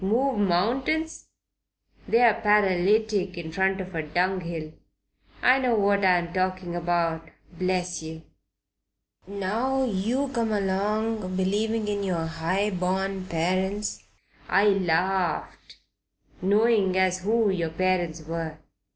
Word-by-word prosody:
Move 245 +5 +1
mountains? 250 - 0 0.8
They're 235 -1 +5
paralytic 205 -1 +2
in 160 -2 -6
front 190 +2 +1
of 190 0 -6
a 165 - -1
dunghill. 170 -1 -2 0.7
I 255 +1 +5
know 250 -3 +1
what 200 -1 +2
I'm 175 -2 +2
talking 185 -1 -2
about, 170 -1 -1 0.2
bless 180 0 -2
yer. 160 0 -8 1.0
Now 220 +7 -1
you 240 +5 -1
come 230 -4 -1
along 205 0 -1
believing 210 +3 0
in 205 -1 -1
yer 170 -4 -1
'igh 180 +4 -1
born 190 +1 -1
parents. 185 +5 -1 0.5
I 200 +2 +4
larfed, 185 -1 -1 0.7
knowing 205 -1 +3
as 185 -1 +2
who 215 +2 +2
yer 170 -4 -1
parents 175 -1 -1
were. 160 -1 -5
190 Hz, 110 wpm, -26 LUFS, 175-210 Hz, 1.0 s, They're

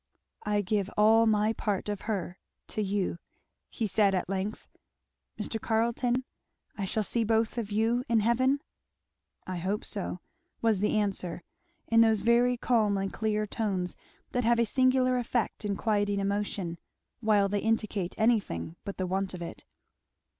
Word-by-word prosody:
"I 210 0 +1
give 200 0 0
all 225 +2 +6
my 215 0 +3
part 205 -3 -2
of 205 -2 -3
her 185 -4 -3 0.3
to 215 - -2
you," 195 -3 -1 0.5
he 230 - -2
said 200 -1 +3
at 180 - -1
length. 195 +3 -3 0.7
"Mr. 220 +1 -3
Carleton, 235 +3 +1 0.5
I 200 - -3
shall 215 +3 -1
see 230 +3 +1
both 225 +1 +1
of 215 -3 -4
you 225 +4 +1
in 230 -2 +4
heaven?" 260 +5 +2 0.8
"I 185 -1 -4
hope 190 +4 -2
so," 190 -3 -3 0.4
was 225 -4 +2
the 210 +2 +1
answer, 190 -4 -2 0.4
in 230 0 +5
those 220 -2 +4
very 240 +2 +3
calm 220 -5 +2
and 195 0 -2
clear 215 -1 0
tones 195 -4 -2 0.4
that 245 - 0
have 235 +1 +4
a 235 - +3
singular 255 +1 +3
effect 235 -2 -2
in 200 -1 0
quieting 205 -1 +1
emotion, 200 -3 -2 0.4
while 210 -3 +3
they 205 +1 0
indicate 215 -4 -1
anything 200 - 0
but 200 - -6
the 185 - -1
want 190 +1 -2
of 175 - -6
it. 170 - -8
210 Hz, 155 wpm, -29 LUFS, 195-230 Hz, 0.8 s, all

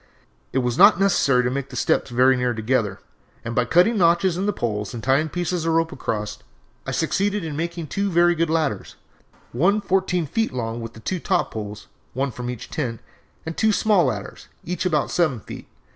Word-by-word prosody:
It - - -2
was 125 -1 -1
not 200 -1 +7
necessary 140 -10 +3
to 125 - 0
make 140 +1 -3
the 125 - -9
steps 125 - +1
very 130 +2 +4
near 125 -1 0
together, 110 -1 0 0.5
and 115 - -3
by 125 +1 +2
cutting 180 - +3
notches 170 +1 +3
in 190 +3 -1
the - - +3
poles 105 - -3
and 115 - -7
tying 140 +4 +2
pieces 175 +1 -2
of 165 0 +1
rope 165 0 +1
across 105 -2 -4 0.5
I - - -1
succeeded 205 0 0
in 155 -3 -5
making 170 +1 -3
two 200 +6 -2
very 175 -1 +4
good 165 -1 0
ladders, 155 -11 -1 0.6
one 185 - +2
fourteen 190 -3 0
feet 225 +9 -1
long, 115 -2 -3
with 115 0 -7
the 110 - -13
two 185 +9 -2
top - - 0
poles 105 -1 -6 0.3
one 135 +1 -1
from 120 +1 -6
each 125 -2 -7
tent; 120 -7 -3 0.5
and 160 0 -5
two 220 -1 +3
small 205 -4 +3
ladders, 105 -6 -4 0.2
each 180 0 -2
about 150 -5 0
seven 155 -9 +1
feet. - - -10
155 Hz, 200 wpm, -23 LUFS, 120-180 Hz, 0.6 s, not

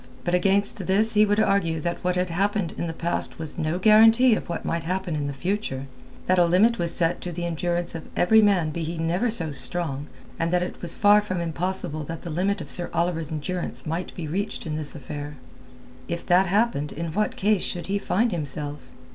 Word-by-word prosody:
But 175 - -2
against 195 +2 +3
this 215 +4 +3
he 210 0 +5
would 205 +1 +2
argue 195 -6 +2
that 170 +3 -3
what 180 0 +1
had 180 -1 -1
happened 200 0 0
in 170 - -3
the - - -3
past 170 +1 -3
was 160 -2 -2
no 155 +2 -1
guarantee 225 +5 +6
of 215 - -3
what 170 - -4
might 165 -1 -2
happen 180 0 -2
in 145 -1 -2
the - - -3
future; 140 -3 -3 0.4
that 185 0 +3
a 175 - +6
limit 210 +7 +3
was 170 -1 +1
set 170 0 +1
to 180 - -5
the 175 +1 -4
endurance 175 +1 -2
of 165 -2 -8
every 220 +5 +5
man 190 -7 +2
be 170 - -4
he 165 +1 -4
never 170 +8 0
so 170 -8 -2
strong, 140 +2 -2 0.3
and 165 - 0
that 180 0 +2
it 180 - -7
was 170 -2 -2
far 205 0 +6
from 185 -4 -3
impossible 170 -1 -2
that 165 +2 -7
the 170 - -5
limit 190 +4 0
of 145 - -5
Sir 175 - -1
Oliver's 165 -2 0
endurance 170 +4 -1
might 165 +3 -3
be 170 -4 -5
reached 195 +7 -3
in 155 -2 -3
this 155 0 -3
affair. 145 +1 -7 0.7
If 170 +2 -4
that 180 +2 +4
happened 200 -7 +1
in 165 0 -5
what 210 +3 0
case 205 -1 +2
should 175 -2 -2
he 200 +1 -1
find 220 +4 +1
himself? 145 -3 -4
175 Hz, 215 wpm, -24 LUFS, 160-200 Hz, 0.7 s, guarantee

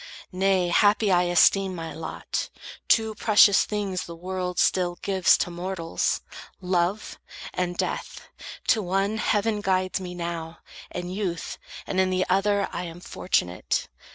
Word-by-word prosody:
Nay, 185 -1 +2
happy 205 +3 +4
I 180 -1 +4
esteem 185 +2 +4
My 165 -1 -6
lot. 160 0 -4 0.4
Two 220 -1 +3
precious 210 -2 +5
things 195 -5 -3
the 170 - -8
world 180 +1 -4
still 175 -2 +2
gives 190 -2 +4
To 175 - -2
mortals, 175 -1 -2 0.4
Love 180 +2 -1 0.3
and 175 -1 -2
Death. - - -4 0.4
To 220 - +4
one, 195 +3 0
heaven 210 -1 +1
guides 185 -1 0
Me 180 -1 -7
now, 170 -1 -5 0.3
in 180 0 -5
youth; 185 -3 -4 0.3
and 190 - -2
in 190 0 +3
the 185 0 +1
other, 200 +1 +2
I 180 - -3
Am 170 0 -8
fortunate. 90 - -1
185 Hz, 140 wpm, -25 LUFS, 175-195 Hz, 0.4 s, precious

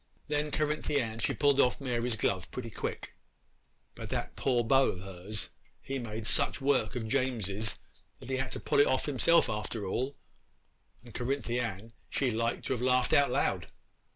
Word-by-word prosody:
'Then 150 0 0
Cerinthy 150 -1 0
Ann 115 -3 -3
she 110 - +1
pulled 140 -1 +3
off 125 - +2
Mary's 120 -3 -1
glove 95 -4 0
pretty 115 -3 -6
quick; - - -5 0.8
but - - -8
that - - -3
poor 125 -3 +1
beau 135 +3 +4
of 90 - -8
hers, 95 +2 -2 0.3
he 135 0 -4
made 110 -2 -5
such - - +3
work 135 -5 +1
of 115 -3 -3
James's 110 -5 0 0.4
that - - -11
he 130 - +1
had 135 -1 -2
to - - -4
pull - - +1
it 145 - +6
off 130 - +1
himself 150 +4 +4
after 105 0 -3
all, 130 +8 -2 0.9
and 120 - -12
Cerinthy 125 -1 -1
Ann 110 -1 -4 0.2
she 130 -3 +1
like 115 +1 -1
to - - -1
have 125 - -3
laughed 125 0 +3
out 140 -2 +5
loud. - - 0
125 Hz, 180 wpm, -31 LUFS, 110-135 Hz, 0.9 s, it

